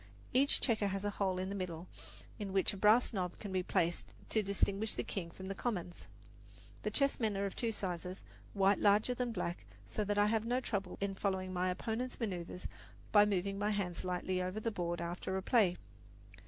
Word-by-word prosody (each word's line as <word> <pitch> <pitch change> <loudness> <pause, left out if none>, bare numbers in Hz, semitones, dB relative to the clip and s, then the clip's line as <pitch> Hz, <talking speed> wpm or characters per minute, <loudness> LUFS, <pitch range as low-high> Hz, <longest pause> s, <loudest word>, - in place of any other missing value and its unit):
Each 270 +3 +5
checker 220 -5 +2
has 195 0 -2
a 205 - 0
hole 190 -2 0
in 185 +1 -2
the - - -3
middle 180 -2 -4 0.5
in 200 -2 -4
which 195 +1 +2
a - - -6
brass 215 +5 +5
knob 180 -3 -2
can 205 - -6
be 185 -1 +1
placed 170 -1 0
to 220 - +3
distinguish 200 +1 +1
the - - -1
king 175 -4 -4
from 190 +3 -9
the 195 - -2
commons. 185 -5 -3 0.7
The - - -1
chessmen 230 -7 +1
are 200 - 0
of 195 - -4
two 230 -2 0
sizes, 180 -2 -4 0.3
the - - -13
white 195 0 +5
larger 210 +4 +4
than 245 0 -1
the 235 - -3
black, 175 -3 -3 0.2
so 215 - -2
that 205 0 -1
I 205 - +6
have 220 +1 +2
no 245 +2 +2
trouble 200 -7 -3
in 200 0 -1
following 190 -1 -1
my 180 0 +1
opponent's 225 +7 -3
maneuvers 180 -5 -3 0.4
by 205 -1 +7
moving 195 0 0
my 205 +1 +1
hands 195 -5 -1
lightly 185 0 -1
over 185 +3 -2
the 230 +1 -1
board 175 -3 -2
after 175 +2 -3
a 190 - -3
play. 200 -6 +4
195 Hz, 210 wpm, -35 LUFS, 185-215 Hz, 0.7 s, by